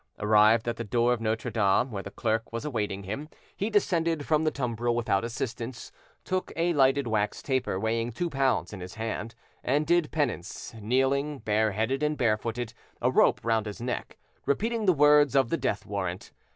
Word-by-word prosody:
Arrived 110 +2 +4
at 120 - -1
the 115 - -3
door 120 +3 +2
of 120 - -4
Notre 115 +2 -1
Dame, 110 +3 +2
where 100 -3 -4
the 100 - -8
clerk 110 +2 -2
was 115 +4 -4
awaiting 105 -8 -2
him, 125 +11 -5 0.3
he 205 - -2
descended 165 -7 +1
from 155 0 +2
the 155 - +3
tumbril 120 -4 -1
without 115 -4 +1
assistance, 115 +1 -5 0.3
took 185 0 -2
a 170 +1 +1
lighted 135 -1 +3
wax 105 -3 -1
taper 130 -8 -1
weighing 115 +2 -1
two 175 +10 -2
pounds 135 -7 0
in 105 - -7
his 90 +1 -8
hand, 115 +1 -4 0.3
and 145 +4 +1
did 170 -1 +2
penance, 125 - -3
kneeling, 135 +6 +1
bareheaded 110 +3 0
and 150 0 0
barefooted, 115 +1 -1 0.3
a - - +2
rope - - +4
round 115 -2 +1
his 105 - -6
neck, 120 +1 -4 0.3
repeating 220 - 0
the - - +8
words 150 -3 +5
of 135 -4 +4
the - - +1
death 105 - -2
warrant. 95 -3 -4
120 Hz, 180 wpm, -28 LUFS, 110-145 Hz, 0.3 s, the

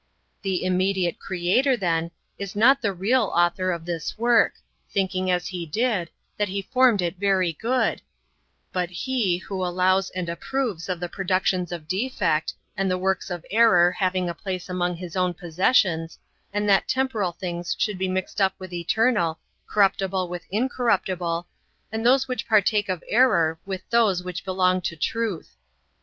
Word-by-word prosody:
The 190 -2 -1
[immediate] 185 -1 +1
Creator, 195 +9 +1
then, 170 -4 0 0.3
is 200 -1 -5
not 265 +6 +5
the 205 - +1
[real] 215 +7 +2
Author 175 +2 +2
of 170 -2 -4
this 170 +1 -4
work, 235 0 +3 0.4
thinking, 185 -1 0
as 180 -1 +1
He 180 -2 -4
did, 205 -1 0 0.3
that 210 - +1
He 195 +1 -3
formed 250 -5 +3
it 175 +2 -2
very 190 -4 +2
good, 245 +9 0 0.7
but 180 -2 -1
He 200 -1 0
who 190 0 -5
allows 185 +2 +2
and 180 -1 -4
approves 195 0 -3
of 180 -2 -2
the 175 - -3
productions 185 -1 0
of 165 -3 -6
defect, 190 -5 0 0.2
and 195 -1 0
the 185 - +1
works 190 +1 -1
of 175 -2 -5
error 190 -6 +5
having 185 -1 0
a 170 - -2
place 185 0 -5
among 180 -1 -1
his 175 0 -8
own 180 -1 +1
possessions, 170 -1 +1 0.3
and 205 +1 -1
that 195 -1 +4
temporal 235 -9 0
things 175 0 -4
should 210 -4 -1
be 190 - 0
mixed 185 +2 -2
up 190 0 +3
with 185 -2 -9
eternal, 175 -1 +1 0.3
corruptible 195 -2 +1
with 175 -1 -7
incorruptible, 190 -7 0 0.5
and 220 0 -3
those 265 +2 +4
which 255 -1 -3
partake 210 -1 +3
of 180 -2 -2
error 195 -10 +3
with 190 -1 -5
those 215 -6 +3
which 180 -2 -5
belong 185 -1 +2
to 170 - -3
truth. 215 +1 -3
185 Hz, 160 wpm, -24 LUFS, 175-210 Hz, 0.7 s, not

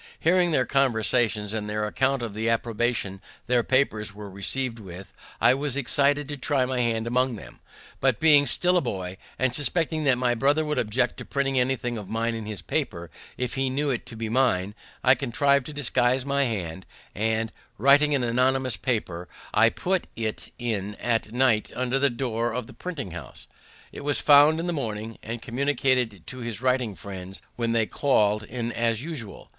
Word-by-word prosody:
Hearing 175 +1 +3
their 130 -6 +2
conversations, 115 -5 +1
and 105 -1 -3
their 105 0 -1
accounts 130 +3 0
of 110 - -7
the 110 +2 -1
approbation 115 -4 -1 0.2
their 125 -1 +2
papers 110 -5 0
were 105 -1 -9
received 115 +5 -2
with, 95 -2 -10 0.3
I - - +5
was 140 0 -2
excited 140 +2 +2
to 145 0 -5
try 135 -1 +1
my 130 0 -2
hand 115 -1 0
among 125 +1 +1
them; - - -12 0.4
but, 130 -3 +2
being 145 -3 +6
still 180 +7 +3
a - - +3
boy, 95 - -4 0.2
and 130 -2 +1
suspecting 155 +2 +1
that 135 -3 +4
my 125 -1 +1
brother 145 +6 +2
would 150 0 -1
object 110 +3 0
to - - -7
printing 135 -1 0
anything 125 -2 -1
of 100 - -9
mine 115 +1 -1
in 110 -2 -5
his 105 -3 -6
paper 85 -2 -2 0.3
if 125 -1 -2
he 135 0 0
knew 140 +2 0
it 120 - -3
to 115 - -9
be 115 0 -4
mine, 110 -5 +1 0.3
I 130 - +7
contrived 140 0 +1
to - - -6
disguise 130 -2 +1
my 140 0 +1
hand, 95 -6 -4 0.3
and, 110 +2 -1 0.3
writing 145 +5 +5
an 130 - 0
anonymous 130 0 +1
paper, 95 -7 -2 0.3
I 115 +1 +5
put 185 +8 -1
it 110 -2 -4
in 105 -4 -3
at 115 -2 -1
night 125 -3 +2
under 130 +1 0
the 140 0 +4
door 120 -2 -2
of 125 -2 -3
the 115 - -13
printing 140 - -6
house. 85 - -10 0.5
It - - -9
was 145 0 +1
found 150 +2 +6
in 165 - -2
the 175 - -1
morning, 110 -5 -4
and 115 +1 -6
communicated 125 - 0
to 130 - -8
his 115 -4 -4
writing 125 -5 0
friends 95 -1 -8 0.2
when 115 -1 -1
they 115 -1 +2
call'd 105 -6 +2
in 115 +2 -4
as 115 0 0
usual. 140 - -7
120 Hz, 185 wpm, -25 LUFS, 110-135 Hz, 0.5 s, I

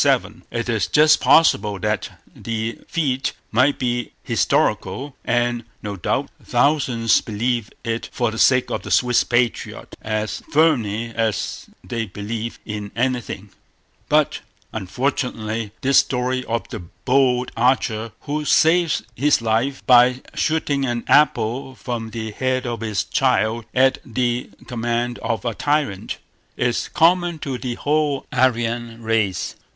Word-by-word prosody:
It 120 0 -3
is 110 -5 0
just 155 +1 +5
possible 105 -11 +4
that 105 +2 -1 0.3
the 115 0 -4
feat 135 -5 -1 0.2
might 130 +5 +3
be 120 -2 -2
historical, 130 +10 0
and, 120 0 0 0.2
no 105 -1 -4
doubt, 90 - -1
thousands 125 -6 +2
believe 115 0 -2
it 115 0 -3
for 120 -3 0
the 110 - -6
sake 130 0 +4
of - - -2
the - - -8
Swiss 125 -1 +3
patriot, 120 -1 -1
as 110 -3 -2
firmly 115 -8 +2
as 110 -3 -2 0.2
they 115 -2 -3
believe 110 +4 -5
in 105 -1 -5
anything; 120 -5 -2 0.6
but, - - +2 0.3
unfortunately, 110 0 -2
this 135 0 +5
story 130 0 0
of 115 0 -2
the - - -5
bold 125 +9 +1
archer 115 -2 +1
who 150 +1 -3
saves 165 +2 +3
his 145 +5 +3
life 115 +4 -1
by 125 +1 +5
shooting 150 -3 0
an 120 -2 -1
apple 130 -2 +2
from 120 -3 -4
the 110 -1 -5
head 130 +3 -1
of 120 -1 -3
his 110 -3 -1
child 115 -4 +1
at 130 +1 +4
the 120 0 -1 0.2
command 120 0 -2
of 115 - -3
a 115 - 0
tyrant, 145 -8 -1 0.4
is 120 -1 0
common 175 +1 +3
to 135 -4 -4
the 125 -2 -3
whole 145 -1 0
Aryan 120 -2 0
race. 110 -5 0
120 Hz, 130 wpm, -21 LUFS, 110-130 Hz, 0.6 s, just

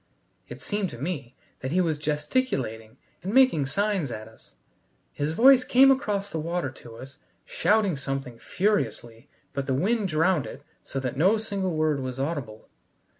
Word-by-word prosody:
It - - -8
seemed 205 -3 -2
to - - -9
me 140 -3 -5 0.2
that 130 - -4
he 180 - +2
was 160 -4 0
gesticulating 150 - -2 0.2
and 190 - -4
making 255 - +5
signs 200 -2 0
at 110 -2 -7
us. 110 - -18 0.6
His 145 +2 -2
voice 255 +6 +6
came 265 +2 +6
across 205 -7 -1
the 160 - -3
water 165 -3 -2
to 120 -3 -13
us 130 +4 -12 0.3
shouting 210 -5 +2
something 135 -3 -5
furiously 120 - -2 0.2
but 140 0 -3
the 135 - +1
wind 205 - +1
drowned 165 -1 +1
it - - -10 0.2
so 135 - -5
that 130 -1 -4
no 190 +9 +4
single 200 -5 -2
word 155 -2 +1
was 130 -1 -5
audible. 135 -7 -4
155 Hz, 165 wpm, -26 LUFS, 130-200 Hz, 0.6 s, voice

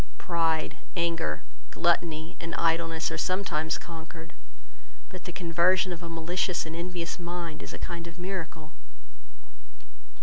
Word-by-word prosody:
Pride, 165 -2 +1 0.2
anger, 170 -1 +1 0.3
gluttony, 165 -2 +2
and 165 0 -3
idleness, 165 0 +2
are 165 - -2
sometimes 170 -3 +1
conquered, 165 -1 -8 0.8
but 185 - -8
the 180 - -3
conversion 180 +2 +4
of 170 - -7
a 170 - -5
malicious 170 +2 +1
and 160 0 -4
envious 175 0 -2
mind 170 -2 -3
is - - -6
a - - -5
kind 170 -1 -3
of 170 0 -9
miracle." 175 -4 -4
170 Hz, 130 wpm, -30 LUFS, 165-175 Hz, 0.8 s, conversion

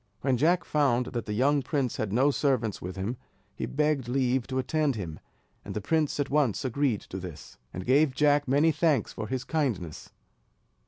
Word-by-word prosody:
When 135 -2 +2
Jack 170 +7 +3
found 130 -5 +2
that 120 -2 -3
the 105 - -2
young 140 +6 +3
prince 135 -2 -1
had 110 -3 -2
no 130 +7 +3
servants 130 -8 0
with 90 +1 -6
him, 100 +6 -3 0.4
he - - -3
begged 150 -3 0
leave 130 -1 +1
to 130 - -3
attend 140 +1 +1
him; 85 -7 -6 0.4
and - - -7
the - - 0
prince 150 +7 0
at 145 - -1
once 145 -3 +1
agreed 130 -3 0
to 95 - -7
this, 85 -4 -10
and 90 +1 -6
gave 135 +1 +3
Jack 145 0 +3
many 145 +5 +4
thanks 150 -8 +1
for 110 - -5
his 130 +2 -3
kindness. 115 - -2
130 Hz, 190 wpm, -28 LUFS, 110-145 Hz, 0.4 s, many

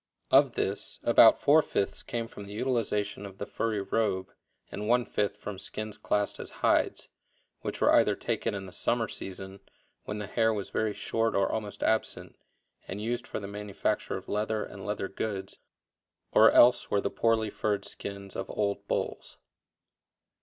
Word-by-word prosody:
Of - - +6
this, - - -2
about - - +7
four 155 +3 +6
fifths 100 -8 -1
came 115 -1 -4
from 100 - -10
the 100 - -9
utilization 110 -4 -1
of 100 -1 -9
the 100 - -4
furry 110 -2 -1
robe 100 -2 -1 0.4
and 105 +1 -4
one 120 0 +4
fifth 105 0 -1
from 105 -2 -7
skins 110 +2 -5
classed 105 0 -1
as - - -6 0.2
"hides," - - +2 0.5
which - - -5
were - - +5
either - - +5
taken 115 - -2
in 95 -1 -5
the 95 - -10
summer 115 +4 0
season, 95 +1 -7 0.5
when 105 - -4
the 105 - -4
hair 110 +1 +1
was 100 - -5
very 110 -1 0
short 115 0 0
or 100 0 +2
almost 105 -3 -4
absent, 110 0 0 0.5
and 95 - -5
used 120 +3 -3
for - - -4
the 100 - -6
manufacture 105 0 -2
of - - -10
leather 105 +1 -1
and 95 0 -9
leather 105 -2 -2
goods, 95 -1 -4 0.7
or - - +7
else 120 0 +6
were 100 - +2
the 100 - -2
poorly 110 -2 +1
furred 100 -2 -1
skins 100 -1 -7
of - - -4
old 100 -1 -2
bulls. - - -3
105 Hz, 170 wpm, -29 LUFS, 100-110 Hz, 0.7 s, about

